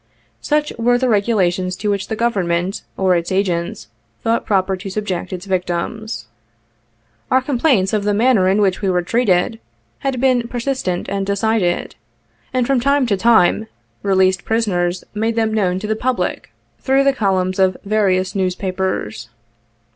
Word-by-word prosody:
Such 300 0 0
were 245 +1 +3
the 255 +1 0
regulations 190 -5 +1
to 205 +2 -1
which 200 -1 -2
the 220 - -3
Government, 190 -5 0 0.2
or 190 -1 +3
its 170 +1 -2
agents, 180 - -1 0.4
thought 230 +1 0
proper 190 -2 +1
to 195 +2 -7
subject 190 -3 -3
its 185 0 -6
victims. 185 - -3 1.0
Our 260 - +4
complaints 250 -7 +1
of 210 -2 +1
the 205 0 +1
manner 220 -4 +3
in 200 +2 +2
which 190 -1 +1
we 195 - 0
were 180 -1 +1
treated, 225 0 +1 0.4
had 270 -2 -2
been 250 -2 +2
persistent 240 -7 -2
and 195 0 -2
decided; 200 -2 0 0.6
and 255 -1 +1
from 270 0 +2
time 280 +2 +2
to 215 -4 +1
time, 220 0 +3 0.3
released 190 -1 +2
prisoners 185 -6 0
made 225 +2 -1
them 220 -1 +1
known 185 -4 +1
to 190 - -5
the 220 +1 0
public 250 +3 -2 0.3
through 270 +1 +2
the 275 0 +3
columns 190 -5 0
of 190 -1 +3
various 195 -3 +1
newspapers. 185 - -2
200 Hz, 155 wpm, -19 LUFS, 185-230 Hz, 1.0 s, Our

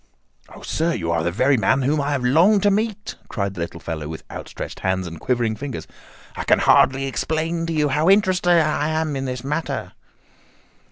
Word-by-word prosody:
"Oh, - - -13
sir, 165 +2 -1
you 85 -5 -2
are 85 -1 +1
the 85 - 0
very 130 +8 +2
man 130 +4 +2
whom 145 +3 +1
I 140 - -2
have 135 -3 -1
longed 175 +11 +4
to 205 - +4
meet," 215 +1 -2
cried 100 -2 -2
the 90 - -6
little 85 0 -5
fellow 80 -3 -5
with 80 +1 -7
outstretched - - -7
hands 95 -1 -1
and 85 -2 -8
quivering 120 -3 0
fingers. 135 +2 -6 0.5
"I - - -4
can - - +4
hardly 135 +1 +4
explain 160 +5 -2
to 165 - -2
you 150 -2 +1
how 150 +6 +2
interested 190 -3 +3
I 150 -1 +1
am 155 -2 -1
in 135 0 -3
this 125 -1 -4
matter." 150 +4 -3
140 Hz, 200 wpm, -22 LUFS, 110-165 Hz, 0.5 s, longed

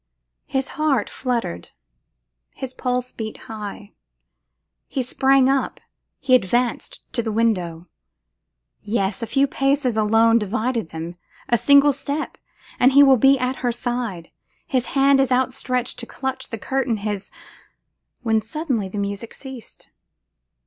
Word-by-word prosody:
His 265 0 -1
heart 275 -9 +1
fluttered, 235 - -3 0.9
his 260 -1 -6
pulse 250 -1 -2
beat 220 -1 -6
high, 210 -1 -8 0.9
he 265 - -2
sprang 265 +1 +3
up, 270 0 0 0.4
he 265 -1 +1
advanced 240 +1 +1
to 240 - +1
the 225 -1 -3
window! 180 -7 0 0.9
Yes! 205 -2 -1
a 230 - -3
few 275 +3 +3
paces 275 -3 +1
alone 225 +2 +4
divide 230 +4 -1 0.2
them: 165 +2 -7 0.3
a 240 - +4
single 280 +3 +5
step 285 +3 -4 0.4
and 255 +2 +5
he 285 +1 +8
will 270 -2 +6
be 270 +3 +5
at 255 +1 -1
her 245 -1 0
side. 235 -8 -4 0.3
His 255 -3 0
hand 275 0 +5
is 270 -1 +2
outstretched 255 -1 0
to 235 - -6
clutch 265 0 -4
the 225 - -4
curtain, 260 0 -1
his, 205 -1 -4 0.9
when 220 -2 +2
suddenly 235 - -2
the 205 - -7
music 200 +3 -4
ceased. 265 -4 -10
245 Hz, 135 wpm, -22 LUFS, 215-265 Hz, 0.9 s, he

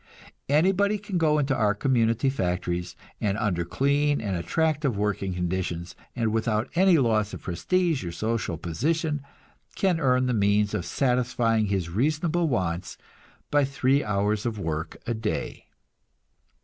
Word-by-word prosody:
Anybody 195 +7 +3
can 200 -3 -3
go 155 -2 +3
into 140 -2 +1
our 105 -3 +2
community 120 +1 +2
factories, 90 -4 -2 0.2
and 100 -1 0
under 90 -5 0
clean 140 - +1
and 100 -4 -2
attractive 150 - 0
working 100 -2 -1
conditions, 90 -1 -3 0.2
and 115 -3 0
without 110 +1 0
any 180 0 +5
loss 110 -6 +1
of - - -11
prestige 165 - 0
or 85 - -4
social 110 -3 -2
position, 150 - -1 0.5
can 185 -4 +1
earn 130 -3 +2
the 125 - 0
means 105 -1 +2
of 105 -5 -2
satisfying 120 -4 +1
his 95 -4 -1
reasonable 155 - +1
wants 90 - -2 0.5
by 145 0 +4
three 140 0 +1
hours 105 +2 0
work 80 -8 -3
a 120 - -1
day. 110 -1 -4
115 Hz, 135 wpm, -26 LUFS, 100-145 Hz, 0.5 s, any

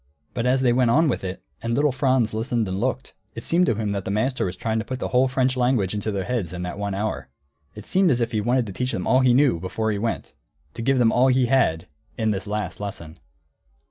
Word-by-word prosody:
But 120 0 -1
as 130 +1 +2
they 125 -2 +3
went 125 -1 +3
on 155 +7 +4
with 120 - -2
it, 95 0 -5 0.2
and 115 0 -1
little 145 +2 +2
Franz 130 -3 +1
listened 115 0 -1
and 95 +1 -3
looked, 130 +2 -2 0.2
it 115 - -7
seemed 180 +2 +3
to 115 - +2
him 105 -1 -2
that 100 -1 -2
the - - -5
master 110 +5 0
was 90 0 -4
trying 110 +3 -1
to - - -2
put 130 +3 -5
the - - -4
whole 130 +1 +3
French 130 0 +1
language 125 -7 +1
into 105 +1 -2
their 100 -2 -2
heads 105 -7 -3
in 90 0 -5
that 90 +2 -5
one 100 -1 -2
hour. 110 +2 -3 0.5
It 105 -1 -10
seemed 190 -1 +3
as 125 -5 +2
if 115 - -1
he 110 - 0
wanted 120 +3 +1
to 100 - -7
teach 125 +5 -2
them 90 - -3
all 130 - +4
he 125 -2 +4
knew, 135 - +3
before 110 +5 -2
he 100 - -2
went, 115 +2 -3 0.4
to 115 - -6
give 135 +3 +2
them 120 -3 +4
all 125 +2 +4
he 130 -1 +3
had, 115 -10 +2 0.3
in 110 -2 +1
this 95 -1 -4
last 105 -3 -3
lesson. 90 -5 -7
115 Hz, 260 wpm, -23 LUFS, 100-130 Hz, 0.5 s, on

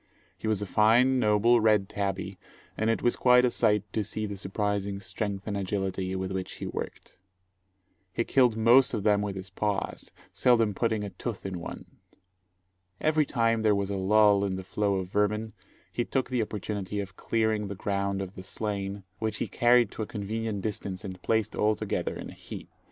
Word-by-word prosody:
He - - -6
was 105 -2 +1
a - - -3
fine, 120 +6 +4
noble, 110 +2 +4
red 105 -3 +3
tabby, 95 -1 -3 0.4
and 110 +1 0
it 115 - 0
was 120 - +3
quite 125 0 +5
a 125 - +2
sight 105 -4 +2
to 110 - 0
see 110 +1 -3
the 100 -1 -5
surprising 100 0 -2
strength 100 0 -4
and 105 - -3
agility 95 -1 -2
with 95 0 -3
which 95 -1 -3
he - - -6
worked. - - -7 0.9
He 115 - 0
killed 125 -4 +3
most 120 +3 +5
of 105 - -3
them 105 -1 +3
with 100 -1 -3
his 95 -1 -7
paws, 100 0 -2 0.2
seldom 115 -4 +3
putting 110 0 0
a 100 - -5
tooth 100 +4 -6
in 95 -2 -4
one. 85 - -7 1.1
Every 155 -1 +2
time 115 -2 +1
there 105 -1 +4
was 100 0 -1
a - - -1
lull 100 +1 +4
in 95 -2 -1
the 95 - -5
flow 100 +1 0
of 95 -1 -3
vermin, 105 +1 0 0.4
he 120 - 0
took 130 +1 -2
the 125 -2 +1
opportunity 105 -1 -3
of 100 -2 -5
clearing 110 -1 0
the 100 - -5
ground 100 0 -1
of 95 0 -8
the 95 - -9
slain, 100 0 -4 0.2
which 110 -1 -2
he - - -2
carried 120 0 +4
to - - -6
a 105 - -2
convenient 110 -1 -3
distance 100 -2 -4
and 95 -2 -7
placed 110 0 0
all 105 0 +2
together - - -2
in - - -7
a - - -11
heap. - - -9
105 Hz, 195 wpm, -28 LUFS, 100-110 Hz, 1.1 s, quite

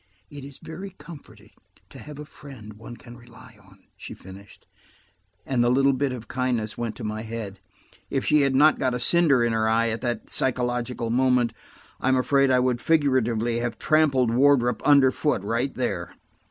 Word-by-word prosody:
"It 145 -2 -9
is 140 -1 -11
very 185 +4 -9
comforting 165 -4 -14 0.4
to - - -12
have 150 -1 -11
a 150 - -8
friend 130 -8 -12
one 110 +3 -11
can 120 0 -13
rely 120 -1 -16
on," 95 0 -22
she - - -10
finished, 95 +2 -14 0.8
and 125 -3 0
the 120 - +2
little 135 +2 +3
bit 135 +1 -1
of 120 -3 -8
kindness 125 -4 -2
went 115 -2 -4
to - - -9
my 110 0 -4
head. 110 -3 -7 0.5
If 135 - -2
she 150 -1 +3
had 135 -1 +1
not 150 +3 +4
got 130 -2 0
a - - -3
cinder 140 -2 +3
in 120 -1 0
her 110 0 +1
eye 115 +1 +2
at 110 0 -4
that 120 -1 -3
psychological 125 -2 -2
moment, 125 -2 +2 0.5
I'm 130 0 +1
afraid 135 +2 +2
I 130 -1 +3
would 125 -1 0
figuratively 120 -7 +1
have 120 -1 -3
trampled 140 -6 +2
Wardrop 125 -2 +3
underfoot, 140 -4 +3
right 115 +6 -1
there. - - -3
125 Hz, 180 wpm, -24 LUFS, 115-140 Hz, 0.8 s, not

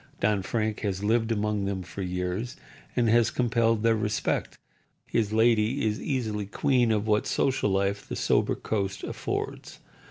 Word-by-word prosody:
Don 105 -1 +2
Frank 110 +2 -1
has 100 -1 -2
lived 115 +2 +2
among 105 -2 0
them 95 -2 -2
for 95 +2 -7
years, 90 +5 -3 0.4
and 120 -2 +2
has 115 +1 +4
compelled 115 -2 +1
their 115 0 +4
respect. 105 -1 -1 0.5
His 110 -3 0
lady 110 +3 +3
is 105 -1 -1
easily 110 -7 -2
queen 125 +1 +2
of 105 -1 +1
what 105 -1 +2
social 130 -5 +1
life 100 +1 0
the - - -3
sober - - +2
coast 100 -2 -3
affords. - - -4
110 Hz, 155 wpm, -27 LUFS, 100-115 Hz, 0.5 s, has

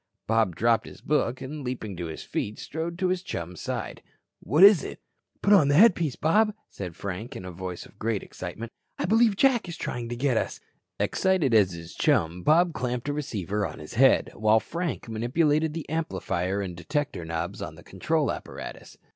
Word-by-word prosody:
Bob 110 -6 +2
dropped 115 +3 +2
his - - -11
book 130 -4 0
and, 145 +2 -6
leaping 120 -6 -4
to 85 -1 -4
his 80 - -7
feet, 105 - -3
strode 165 +2 -5
to 185 -1 +1
his 185 -1 0
chum's 90 - -6
side. - - -4 0.4
"What 155 +6 +3
is 200 -4 +8
it?" - - -7 0.4
"Put 205 - +5
on 155 -8 +6
a 145 - +4
headpiece, 170 - +5
Bob," 210 +6 +2 0.2
said 90 -4 -6
Frank 100 +7 -5
in 90 - -7
a 90 - -6
voice 90 0 -6
of - - -19
great 110 -2 -1
excitement. 110 +6 -7 0.3
"I - - -1
believe 220 +2 +4
Jack 245 -4 +3
is 170 - -6
trying 120 -1 -4
to 120 - -3
get 125 -1 +1
us." - - -2 0.4
Excited 185 -10 +2
as 100 -5 +5
his 85 0 -9
chum, 85 +2 +1
Bob 170 - +4
clamped 125 -1 -3
a - - 0
receiver 105 - -2
on 80 -6 -4
his 75 +5 -10
head, 130 +3 +4
while 110 +1 +4
Frank 170 +4 -4
manipulated 150 +7 +1
the 165 - -5
"amplifier" 100 - -2
and 90 -3 -5
"detector" 145 - -2
knobs 80 0 -4
on - - -6
the - - -14
control - - 0
apparatus. - - -8
125 Hz, 190 wpm, -27 LUFS, 95-160 Hz, 0.4 s, is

